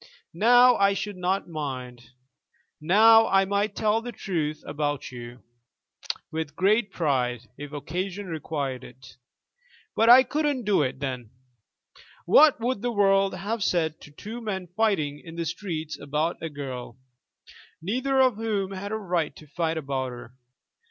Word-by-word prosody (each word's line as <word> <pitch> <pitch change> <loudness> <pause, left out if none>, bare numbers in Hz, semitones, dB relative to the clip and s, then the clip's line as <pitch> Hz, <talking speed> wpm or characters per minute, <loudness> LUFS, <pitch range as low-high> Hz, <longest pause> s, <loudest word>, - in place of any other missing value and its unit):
Now 245 +6 +6
I 200 0 +3
should 205 0 -4
not 185 +2 -1
mind. 130 -7 -6 0.7
Now 225 +7 +6
I 195 0 +3
might 200 +1 -1
tell 215 +1 +1
the 245 +1 -6
truth 155 -8 -3
about 145 -2 -3
you, 120 0 -10 0.9
with 160 -2 -4
great 205 +3 +2
pride, 125 -6 -1
if 145 +1 -9
occasion 180 +7 -4
required 145 -6 -4
it. 125 0 -14 0.8
But 225 +1 +4
I 255 +2 +10
couldn't 290 -1 -1
do 205 -5 +2
it 130 -2 -2
then. 125 -5 -4 1.0
What 295 - +6
would 235 -2 -1
the 245 - -1
world 195 -2 +3
have 205 +4 -3
said 160 -4 0
to - - -13
two 215 +11 -8
men 195 -5 -4
fighting 175 -10 0
in 165 -1 -10
the 170 0 -3
streets 160 -2 -5
about 150 +4 -2
a 165 - -4
girl, 130 -5 -7 0.8
neither 260 +9 0
of 255 -5 +3
whom 210 -4 -2
had 195 +1 -6
a 220 - -1
right 175 -8 -2
to 155 - -13
fight 165 +2 -2
about 135 -3 -3
her? 120 0 -10
175 Hz, 150 wpm, -26 LUFS, 145-210 Hz, 1.0 s, I